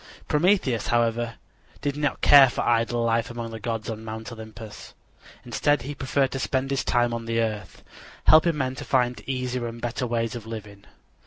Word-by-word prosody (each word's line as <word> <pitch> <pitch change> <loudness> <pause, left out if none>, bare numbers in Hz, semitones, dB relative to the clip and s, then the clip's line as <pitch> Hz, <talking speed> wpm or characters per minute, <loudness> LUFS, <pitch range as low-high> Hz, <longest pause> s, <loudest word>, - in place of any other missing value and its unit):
Prometheus, 150 - +2
however, 120 0 +1 0.5
did 140 -1 -1
not 145 -1 -1
care 140 -3 +8
for - - -3
idle 120 0 +1
life 115 0 +1
among 115 -1 -6
the 110 - -7
gods 115 0 -3
on 110 -1 -5
Mount 110 +2 -7
Olympus. 110 -1 -10 0.5
Instead 145 -4 +1
he 145 +3 -5
preferred 135 0 0
to 135 - -3
spend 135 0 -1
his 135 - 0
time 120 -1 +1
on 115 -1 -4
the 115 0 -1
earth, 110 -2 -3 0.4
helping 160 0 +5
men 130 -2 -1
to - - -7
find 125 -2 +1
easier 125 -2 -2
and 115 0 -7
better 120 +2 -3
ways 115 -1 -1
of 115 -3 -7
living. 105 -3 -8
120 Hz, 180 wpm, -25 LUFS, 115-135 Hz, 0.5 s, care